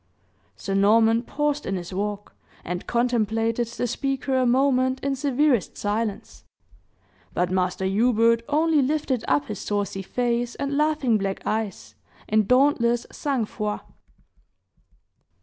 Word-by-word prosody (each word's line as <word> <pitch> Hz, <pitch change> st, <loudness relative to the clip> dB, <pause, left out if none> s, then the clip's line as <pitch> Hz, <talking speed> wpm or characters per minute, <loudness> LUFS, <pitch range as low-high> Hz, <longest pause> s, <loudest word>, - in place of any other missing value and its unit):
Sir 195 Hz, -, -5 dB
Norman 225 Hz, +3 st, +4 dB
paused 295 Hz, +3 st, -2 dB
in 195 Hz, -, -2 dB
his 175 Hz, 0 st, -6 dB
walk, 205 Hz, +1 st, -4 dB, 0.3 s
and 180 Hz, +1 st, -5 dB
contemplated 230 Hz, -1 st, 0 dB
the 235 Hz, +1 st, -3 dB
speaker 270 Hz, +2 st, -2 dB
a 255 Hz, -1 st, +2 dB
moment 260 Hz, 0 st, +2 dB
in 275 Hz, 0 st, -1 dB
severest 275 Hz, -, +1 dB
silence. 210 Hz, 0 st, -3 dB, 0.9 s
But 180 Hz, 0 st, 0 dB
Master 185 Hz, 0 st, 0 dB
Hubert 230 Hz, +3 st, +3 dB
only 310 Hz, 0 st, +3 dB
lifted 270 Hz, -3 st, 0 dB
up 145 Hz, 0 st, +2 dB
his 210 Hz, -, -6 dB
saucy 205 Hz, -2 st, -2 dB
face 240 Hz, +3 st, -1 dB
and 280 Hz, 0 st, -3 dB
laughing 295 Hz, -7 st, +2 dB
black 195 Hz, -1 st, -3 dB
eyes, 210 Hz, -, -3 dB, 0.3 s
in 215 Hz, -1 st, +2 dB
dauntless 250 Hz, -2 st, +3 dB
sang 270 Hz, -6 st, -1 dB
froid. 210 Hz, 0 st, -4 dB
235 Hz, 125 wpm, -24 LUFS, 205-265 Hz, 0.9 s, Norman